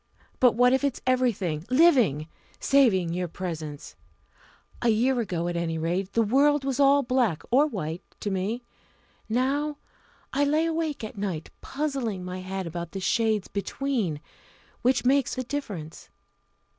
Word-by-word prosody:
But 250 -3 +5
what 250 +2 +5
if 265 - +2
it's 280 -3 0
everything? 225 -12 +1
living? 250 - +4 0.3
saving 200 -12 +3
your 180 0 -2
presence! 160 -4 -6 0.9
A 240 - +2
year 245 +4 +2
ago 175 -6 -2
at 175 - -2
any 165 -1 -1
rate 180 +4 -2
the 230 - +3
world 280 +6 +3
was 270 0 -1
all 280 0 +5
black 240 -9 +1
or 280 +5 +5
white 175 - -4 0.2
to 205 - -2
me. 200 +6 -2 0.7
Now 280 +5 0 0.6
I 280 +2 +2
lie 300 +2 +2
awake 320 -5 -2
at 215 -2 -7
night, 185 -6 -3
puzzling 270 -10 -3
my 180 0 -5
head 190 0 -4
about 170 0 -6
the 195 - -3
shades 220 +1 +1
between 200 - -2 0.6
which 255 0 +2
makes 270 0 +3
the 255 - -2
difference. 205 - -6
225 Hz, 145 wpm, -26 LUFS, 180-270 Hz, 0.9 s, But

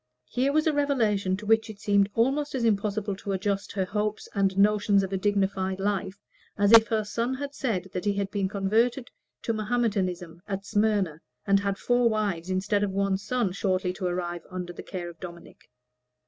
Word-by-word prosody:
Here 260 - 0
was 310 +1 +2
a 315 - +3
revelation 220 -10 +1
to 210 - -9
which 225 +1 +3
it 210 -2 -9
seemed 200 -1 +3
almost 275 +5 +1
as 250 - -1
impossible 205 -1 0
to 200 0 -4
adjust 195 +1 -2
her 190 -2 0
hopes 210 +2 -2
and 195 -1 +1
notions 205 0 +4
of 195 0 -4
a - - +1
dignified 195 -1 0
life 195 -1 -1 0.4
as 205 0 +3
if 225 0 +9
her 220 -1 0
son 235 +4 -2
had 285 +1 -5
said 215 -11 -2
that 180 +2 -3
he 205 - +2
had 200 -1 -2
been 195 -2 -1
converted 225 +6 0 0.3
to 230 - 0
Mahometanism 200 -7 -1
at 195 0 -4
Smyrna, 205 -7 +1 0.2
and 200 0 +4
had 200 0 -1
four 245 -1 +2
wives, 200 -6 -1
instead 195 +2 0
of 205 - +1
one 195 0 +1
son, 205 +1 -1
shortly 185 -1 0
to 185 0 -3
arrive 175 -1 -3
under 180 -1 -5
the - - -8
care 180 -2 -6
of 170 -1 -11
Dominic. 170 -1 -11
200 Hz, 190 wpm, -27 LUFS, 190-220 Hz, 0.4 s, if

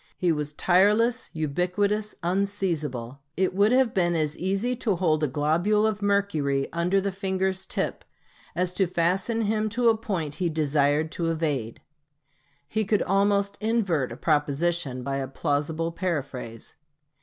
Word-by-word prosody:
He 180 -3 +2
was 150 -1 -2
tireless, 210 +9 +3
ubiquitous, 180 +7 -1
unseizable. 170 - -2 0.2
It 190 0 +1
would 200 +3 +3
have 255 -2 +3
been 175 -2 +1
as 155 -1 0
easy 195 +7 -1
to 220 -5 0
hold 160 -3 +1
a - - +3
globule 165 +10 +1
of 215 -1 -1
mercury 160 -10 +1
under 175 +3 +2
the 200 +1 -1
finger's 190 -1 -1
tip - - -2 0.5
as 180 +1 0
to 190 0 +1
fasten 185 +7 0
him 215 +1 0
to 235 +2 +2
a 225 - +4
point 170 -9 -3
he 175 - +2
desired 150 0 +1
to 165 -1 -1
evade. 145 -9 -2 0.9
He 220 +8 0
could 210 0 +1
almost 200 +1 +1
invert 195 - 0
a 120 - -7
proposition 145 -2 0
by 135 +1 -2
a 135 -1 -3
plausible 150 +4 -1
paraphrase. 140 - -4
175 Hz, 145 wpm, -26 LUFS, 150-200 Hz, 0.9 s, a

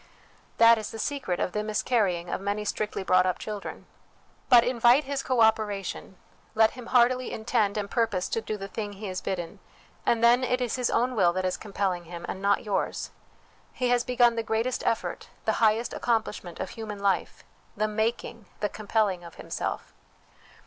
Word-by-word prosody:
That 230 0 +7
is 215 0 -5
the 225 - -8
secret 245 -7 -2
of - - -1
the 210 - -1
mis 215 0 -1
carrying 185 -8 +1
of - - -3
many 205 +1 -2
strictly 210 -1 -2
brought 185 0 +4
up 180 - 0
children. 210 -2 -7 0.6
But 240 -2 +8
invite 245 +3 +4
his 275 0 -3
co 255 -3 +1
operation, 205 -4 0 0.4
let 220 0 +5
him 250 -2 -10
heartily 250 +1 +3
intend 220 -2 0
and 205 -1 -2
purpose 215 -5 0
to 225 - -1
do 215 -1 -4
the 195 -1 -6
thing 205 0 -5
he 205 +1 -7
is 185 0 -4
bidden, 175 -4 -4 0.4
and 230 -1 +1
then 240 +2 +5
it 250 0 +1
is 245 -3 -1
his 250 -2 0
own 250 +2 +1
will 180 -5 +4
that 185 +1 -1
is 185 - 0
compelling 195 -4 -2
him, 170 0 -8
and 190 - -5
not 200 0 +2
yours; 205 -2 -2 0.6
he 250 -1 -1
has 245 0 +3
begun 245 -1 +3
the 230 - 0
greatest 225 +2 -1
effort, 230 - -2 0.2
the - - +3
highest 225 +1 +3
accom 230 -2 +1
plishment 175 -6 -9
of - - -4
human 215 -2 -6
life 200 -1 -1 0.3
the 215 +1 +1
making, 220 0 -2
the 210 - 0
compelling 205 -4 0
of 170 - -11
himself. - - -5
215 Hz, 190 wpm, -27 LUFS, 195-235 Hz, 0.6 s, But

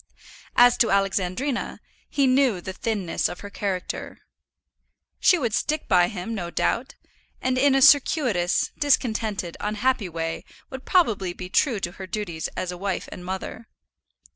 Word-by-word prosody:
As 245 0 +6
to 235 - +3
Alexandrina, 195 +6 -1 0.3
he 280 - +2
knew 255 -6 +3
the 190 +2 -6
thinness 200 -4 -1
of - - -8
her 205 - -9
character. 195 -3 -4 1.0
She 365 - +5
would 240 -9 -1
stick 310 +5 -1
by 180 -3 +4
him, 210 +2 -5
no 175 -6 -4
doubt; 235 +8 -1 0.4
and 255 0 0
in 270 +1 +4
a 270 - +4
circuitous, 250 - +4
discontented, 220 - 0
unhappy 215 0 0
way, 165 0 -4 0.3
would 265 0 -8
probably 215 - +2
be 180 0 -8
true 235 +2 +2
to 175 - -2
her 190 +1 -9
duties 175 -5 -4
as 180 - -2
a 180 - -7
wife 195 -1 -3
and 180 - -8
mother. 190 +4 -6
210 Hz, 150 wpm, -24 LUFS, 180-255 Hz, 1.0 s, As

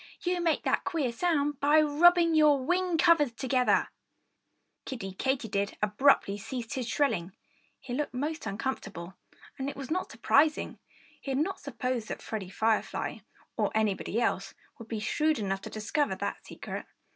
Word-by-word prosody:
You 355 0 0
make 330 -2 +1
that - - +1
queer 300 -9 -1
sound 290 0 0
by 295 +2 +5
rubbing 335 +3 +5
your 300 -2 +5
wing 355 +5 +1
covers 320 -5 +4
together!" 255 0 +2 0.9
Kiddie 205 -8 -6
Katydid 215 -4 -1
abruptly 210 -1 +3
ceased 235 +3 -5
his 255 -4 -3
shrilling. 220 - 0 0.5
He 250 - -7
looked 290 +3 -2
most 300 0 -3
uncomfortable. 200 -5 -4 0.5
And 265 +1 -2
it - - -7
was 275 +1 -7
not 370 +3 -1
surprising. 285 +7 +2 0.4
He - - -7
had 265 - 0
not 380 +6 -1
supposed 250 -4 -3
that - - -6
Freddie 205 -5 -5
Firefly 220 +2 -1 0.4
or - - +1
anybody 215 0 0
else 195 -4 -1 0.2
would 230 - -10
be 225 -1 -3
shrewd 305 +8 +1
enough 195 -2 -2
to - - -7
discover 250 +8 -1
that - - -4
secret. - - -7
265 Hz, 155 wpm, -29 LUFS, 220-305 Hz, 0.9 s, by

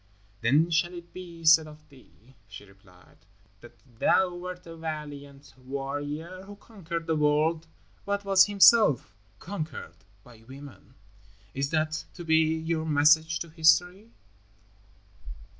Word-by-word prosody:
"Then 150 +9 +2
shall 175 +2 0
it 170 0 -12
be 170 -3 -11
said 160 0 +6
of 150 0 -15
thee," 130 -2 -21
she 105 -1 -12
replied, 95 -2 -22 0.4
"that 120 - -15 0.3
thou 185 -2 +2
wert 180 0 -8
a 165 -1 -10
valiant 145 -4 -8
warrior 145 +6 -6
who 200 +2 -12
conquered 175 -6 -7
the 165 -1 -1
world, 155 +2 +1 0.4
but 200 0 -3
was 195 -1 +5
himself 195 - +4 0.2
conquered 155 - -7 0.3
by 115 -2 -18
women. 135 -1 -14 0.6
Is 140 +1 -2
that 155 0 -2
to 175 - -9
be 160 0 +3
your 160 0 -3
message 155 +2 +3
to 170 - -6
history?" 175 +6 +2
160 Hz, 125 wpm, -27 LUFS, 140-175 Hz, 0.6 s, said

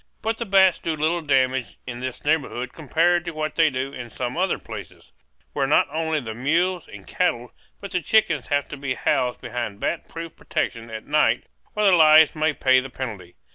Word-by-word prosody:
But 225 +1 -1
the 235 - -3
bats 190 -2 +5
do 165 - -2
little 160 +3 0
damage 130 -4 0
in 120 -1 -6
this 130 +1 -6
neighborhood 140 -5 -1
compared 170 +3 +1
to 170 - -4
what 155 0 -3
they 160 -1 +4
do 135 0 -4
in 120 -3 -7
some 125 +2 -4
other 185 +2 +1
places, - - -10 0.4
where 135 - 0
not 145 - +4
only 160 0 -1
the 110 -5 -6
mules 170 +9 0
and - - -12
cattle 125 -9 -1 0.3
but 200 - -8
the 180 -2 -1
chickens 155 - +2
have 145 0 0
to 145 - -7
be 135 -2 -3
housed 125 0 0
behind 120 -4 -5
bat 170 - -2
proof 165 0 -8
protection 115 0 -3
at 110 -1 -7
night 150 +1 +2 0.3
or 210 - 0
their 195 -2 +5
lives 155 -2 +7
may 155 +1 +1
pay 130 -3 +3
the 135 +1 -6
penalty. 105 -10 -7
150 Hz, 200 wpm, -23 LUFS, 125-165 Hz, 0.4 s, lives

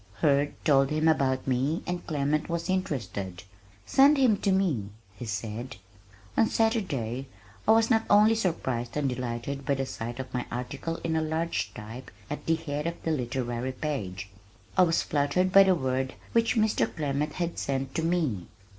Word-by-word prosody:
Hurd 140 +6 +2
told 135 -3 +4
him 155 +1 +1
about 135 -4 +2
me 135 +5 0
and 175 0 -4
Clement 150 0 0
was 170 +2 -1
interested. 115 - -3 0.4
"Send 280 - +5
him 255 -6 +5
to 200 - +1
me," 165 - +1 0.3
he 120 - -7
said. 110 +3 -4 0.6
On 225 - +4
Saturday 140 - 0 0.4
I - - +7
was 225 +2 +3
not 225 -1 +3
only 210 +2 +6
surprised 130 - -1
and 145 -2 +1
delighted 125 +2 -3
by 140 - +1
the 135 0 -1
sight 120 0 -6
of 130 -1 -6
my 125 -1 -2
article 125 +7 -4
in 160 -1 0
large 165 +2 -1
type 110 +4 -8 0.2
at 150 - -5
the 165 - +4
head 150 -1 -3
of 170 - -4
the 165 - 0
literary 125 -2 -2
page, 105 -11 -4 0.5
I 185 - +5
was 165 -2 +3
fluttered 150 +6 +1
by 195 - +9
the 190 -1 +5
word 130 -3 -1 0.2
which 230 +1 +2
Mr. 215 - +2
Clement 145 0 -1
had 175 -1 -3
sent 135 -1 -2
to - - -1
me. 160 - 0
145 Hz, 170 wpm, -28 LUFS, 125-170 Hz, 0.6 s, by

